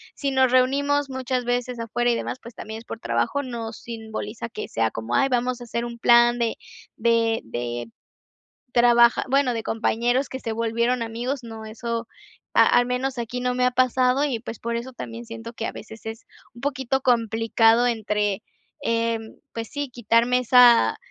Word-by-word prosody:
si 275 -1 -2
nos 260 -1 +3
reunimos 280 +2 +2
muchas 255 -1 -2
veces, 245 0 -1
afuera 240 +1 0
y - - +1
demás, 250 - -4
pues 235 0 -12
también 220 0 -7
es 230 - -14
por 225 - -7
trabajo. 115 - 0
No 230 -3 -5
simboliza 225 0 -6
que 215 - -6
sea 115 -1 0
como: 115 +2 -3
"Ay, 270 - +3
vamos 250 0 0
a - - -7
hacer 235 0 -3
un 235 0 -7
plan 240 0 +5
de 230 -1 0 0.4
de 230 0 +2
de 120 0 -4 0.8
trabaja 240 0 +5
bueno, 270 -1 +3
de 225 -1 -3
compañeros 240 +4 0
que 260 - -5
se 225 -3 -4
volvieron 235 +2 0
amigos", 240 +3 -3
no. 225 -1 -8
Eso, 230 +1 -4 0.5
a - - +6
al 245 - +4
menos 250 +1 -2
aquí, 240 +1 -4
no 250 0 0
me 250 - +2
ha 250 - +3
pasado. 255 +2 +2
Y 265 -6 -1
pues, 225 0 -8
por 235 0 -3
eso 250 +2 -6
también, 230 0 -7
siento 230 0 -8
que 230 - -4
a - - -2
veces 220 +1 -11
es 225 0 -7 0.3
un 235 - -13
poquito 270 -2 -1
complicado, 225 0 +3
entre 210 -3 -1 0.4
Em, 230 -1 -1 0.2
pues 225 -1 -4
sí, 285 -1 -4
quitarme 240 +1 +2
esa 250 - +6
235 Hz, 180 wpm, -24 LUFS, 225-250 Hz, 0.8 s, a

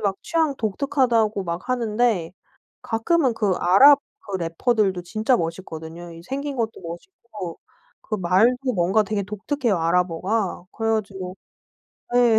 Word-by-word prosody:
막 200 -2 0
취향 320 -4 +1
독특하다고 225 -3 +1
막 170 +8 -5
하는데 225 -7 +1 0.5
가끔은 255 +4 +1
그 220 -2 -1
아랍 270 +11 +7 0.2
그 195 -2 -5
래퍼들도 185 +2 0
진짜 215 +7 +1
멋있거든요. 165 -1 -5
이 165 - -11
생긴 275 +4 -4
것도 225 -2 -1
멋있고 180 - -8 0.4
그 215 - -3
말도 230 +8 +2
뭔가 185 +4 +3
되게 205 -1 -2
독특해요, 210 - -1
아랍어가. 180 +4 0
그래 225 0 -2
가지고 195 -3 -4 0.8
예. 240 -3 +5
210 Hz, 285 characters per minute, -23 LUFS, 180-245 Hz, 0.8 s, 아랍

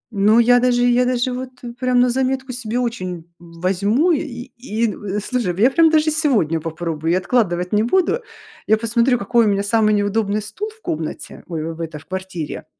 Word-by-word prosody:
ну, 210 +3 +4
я 245 +1 +5
даже, 245 -1 +2
я 245 0 +3
даже 250 0 0
вот, 255 0 -5 0.3
прям, 255 -1 +2
на 245 0 +4
заметку 265 0 -1
себе 240 -2 -4
очень 185 -9 -3
возьму, 190 - 0
и 255 -4 -3
и, 230 -3 -1 0.3
слушай, 210 -5 -2
я 250 +5 +5
прям 330 +2 +5
даже 310 0 +3
сегодня 235 - +1
попробую, 165 0 -3
я 185 - +3
откладывать 185 -4 0
не 210 - +4
буду. 375 - +1 0.5
Я 220 - +4
посмотрю, 235 +3 +2
какой 230 +3 +2
у - - +3
меня 200 0 0
самый 215 +1 +2
неудобный 205 +1 0
стул 400 - -5
в 440 - -19
комнате, 155 0 -5
ой, 165 -3 -4
в 160 - -13
эта 160 -2 -5
в 150 - -14
квартире. 185 -3 -6
225 Hz, 185 wpm, -20 LUFS, 185-250 Hz, 0.5 s, я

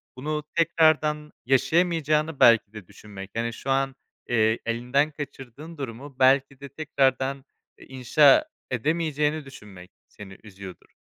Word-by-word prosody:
Bunu 150 +3 -4
tekrardan 155 -2 +2
yaşayamayacağını 155 +2 +1
belki 115 -2 +5
de 105 -5 -11
düşünmek, 100 -2 -12
yani 115 0 -2
şu 135 - -8
an, 135 0 0 0.3
eee, 110 -1 +2
elinden 125 +6 0
kaçırdığın 145 +2 -10
durumu 135 +1 -8
belki 135 +1 +3
de 140 - -10
tekrardan, 135 -2 -1 0.3
eee, - - -15
inşa 135 - +4 0.3
edemeyeceğini 150 +3 -1
düşünmek 100 -9 -13 0.2
seni 95 -2 -13
üzüyordur. 100 -3 -12
135 Hz, 120 wpm, -25 LUFS, 115-150 Hz, 0.3 s, belki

